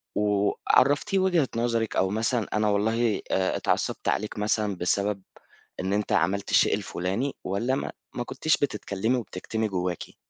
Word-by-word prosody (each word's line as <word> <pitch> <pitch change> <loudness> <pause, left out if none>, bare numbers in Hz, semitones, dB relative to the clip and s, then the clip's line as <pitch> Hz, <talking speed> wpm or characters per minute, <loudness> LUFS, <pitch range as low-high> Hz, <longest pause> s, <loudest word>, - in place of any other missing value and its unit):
وعرّفتيه 105 - +2
وجهة 175 -7 +3
نظرِك 115 -1 0
أو 95 - +2
مثلًا 110 +2 0
أنا 105 0 +2
والله 110 +1 +1
آآ، 95 0 +1
اتعصّبت - - -1
عليك 105 0 -1
مثلًا 105 -1 0
بسبب 100 +3 0 0.6
إن 95 +2 -1
أنت 105 0 -1
عملت 95 +5 +1
الشيء - - +4
الفلاني، 95 +11 -2
والّا 115 +8 0
ما - - -3 0.2
ما 120 - -2
كنتيش 155 +5 0
بتتكلمي 110 -3 -1
وبتكتمي 110 +1 -3
جوّاكِ؟ 90 -2 -3
105 Hz, 140 wpm, -26 LUFS, 100-120 Hz, 0.6 s, الشيء